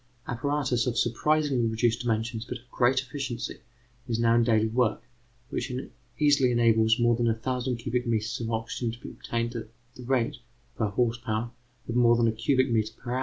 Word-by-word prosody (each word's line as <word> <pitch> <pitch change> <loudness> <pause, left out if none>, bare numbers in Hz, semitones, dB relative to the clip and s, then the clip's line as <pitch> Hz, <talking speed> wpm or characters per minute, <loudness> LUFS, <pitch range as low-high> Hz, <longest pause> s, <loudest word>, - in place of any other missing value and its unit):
Apparatus, 130 -1 0
of 120 -2 -1
surprisingly 135 +1 +2
reduced 115 +1 +1
dimensions 115 -1 -1
but 120 - -6
of 120 - -22
great 130 +1 +3
efficiency, 130 -2 -5 0.5
is 115 -2 -1
now 115 0 +4
in 120 0 +4
daily 110 -2 +3
work, 115 0 +1 0.5
which 130 - -3 0.5
easily 145 -3 +4
enables 115 -1 +4
more 120 -1 +3
than 120 0 0
a 115 - +2
thousand 125 +1 -2
cubic 120 +2 -2
metres 110 -1 -1
of 115 -1 -3
oxygen 115 +1 -2
to 120 - -10
be - - -9
obtained 115 +1 -3
at 115 -1 -5 0.3
the 125 - -11
rate, 120 -2 0 0.4
per 110 - 0
horse 120 +4 0
power, 115 0 -2 0.4
of 115 - -3
more 120 -1 +5
than 115 0 +3
a - - +3
cubic 130 +3 +1
metre 110 -1 +1
per 120 - -7
hour. 125 - 0
120 Hz, 190 wpm, -27 LUFS, 115-125 Hz, 0.5 s, more